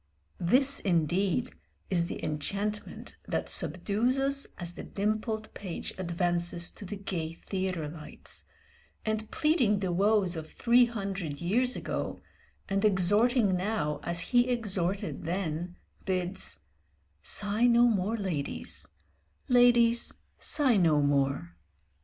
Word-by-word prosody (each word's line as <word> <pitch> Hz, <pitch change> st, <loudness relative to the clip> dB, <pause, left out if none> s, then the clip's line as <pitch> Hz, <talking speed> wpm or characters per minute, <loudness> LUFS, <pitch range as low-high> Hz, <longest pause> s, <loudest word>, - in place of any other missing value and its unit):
This 265 Hz, +10 st, +3 dB
indeed 185 Hz, -, +1 dB, 0.4 s
is 170 Hz, -2 st, +2 dB
the -, -, -5 dB
enchantment 200 Hz, +8 st, -3 dB
that -, -, -2 dB
subdues 200 Hz, -, 0 dB
us 275 Hz, +1 st, +1 dB
as 175 Hz, -1 st, -5 dB
the -, -, -8 dB
dimpled 215 Hz, +2 st, -2 dB
page 185 Hz, -4 st, -6 dB
advances 175 Hz, -1 st, -1 dB
to 205 Hz, -, -10 dB
the 205 Hz, -, -5 dB
gay 175 Hz, -5 st, -4 dB
theatre 185 Hz, -3 st, -3 dB
lights, 155 Hz, 0 st, -8 dB, 0.6 s
and 220 Hz, 0 st, -2 dB
pleading 290 Hz, -10 st, +2 dB
the 190 Hz, -2 st, -1 dB
woes 195 Hz, 0 st, +2 dB
of 160 Hz, -1 st, -7 dB
three 245 Hz, +1 st, +5 dB
hundred 195 Hz, -10 st, -4 dB
years 245 Hz, +9 st, +1 dB
ago, -, -, -3 dB, 0.5 s
and 195 Hz, +1 st, 0 dB
exhorting 205 Hz, +2 st, +3 dB
now 180 Hz, -6 st, -1 dB
as 170 Hz, 0 st, 0 dB
he 245 Hz, +1 st, +5 dB
exhorted 195 Hz, -, 0 dB
then, 175 Hz, 0 st, -3 dB, 0.3 s
bids 185 Hz, -, -2 dB, 0.6 s
"Sigh 205 Hz, -, +2 dB
no 240 Hz, 0 st, +5 dB
more, 220 Hz, -1 st, +2 dB
ladies; 175 Hz, -9 st, -3 dB, 0.6 s
ladies, 240 Hz, -1 st, +5 dB, 0.2 s
sigh 265 Hz, -7 st, +3 dB
no 160 Hz, -5 st, +4 dB
more." 135 Hz, -11 st, +1 dB
195 Hz, 115 wpm, -29 LUFS, 170-225 Hz, 0.6 s, three